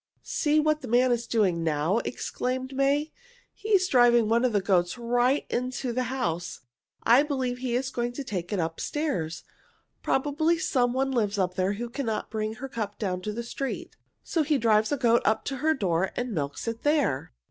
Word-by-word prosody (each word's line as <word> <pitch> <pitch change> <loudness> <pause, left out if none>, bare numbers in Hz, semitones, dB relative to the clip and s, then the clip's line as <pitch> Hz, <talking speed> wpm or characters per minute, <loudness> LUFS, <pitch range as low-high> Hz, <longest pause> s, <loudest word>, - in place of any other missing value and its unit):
"See 300 0 +1
what 305 0 +1
the 260 - -7
man 245 +2 +3
is 235 0 0
doing 185 -7 +1
now!" 160 +6 +1
exclaimed 255 +2 -3
May. 280 +3 +1 0.4
"He 430 - -8
is 380 -3 +4
driving 240 - +5
one 230 +2 +2
of 255 - +3
the 205 - +2
goats 185 0 +1
right 245 +3 +1
into 250 0 -2
the 255 +1 0
house. 175 -10 -3 0.4
I 240 +4 +6
believe 260 -4 -2
he 250 -2 -2
is 260 +2 -1
going 240 -1 -2
to 280 - -5
take 185 -7 -4
it 205 - 0
up 165 0 -2
stairs. 185 - -2 0.6
Probably 300 +5 +1
some 245 -6 +1
one 270 +1 0
lives 210 -5 0
up 185 -2 0
there 185 +1 0
who 235 +4 -4
cannot 235 -3 -3
bring 215 0 -2
her 260 +3 -6
cup 215 -5 -4
down 185 -4 -2
to 210 - -3
the 235 +3 -4
street, 270 +3 -5 0.3
so 330 - 0
he 300 -1 +2
drives 220 -1 +3
a 290 - +1
goat 235 -2 +3
up 220 - +1
to 270 - -3
her 315 +4 +2
door 185 -5 0
and 245 -2 -3
milks 145 +4 -3
it 230 0 -3
there." 290 - +1
240 Hz, 200 wpm, -27 LUFS, 205-270 Hz, 0.6 s, I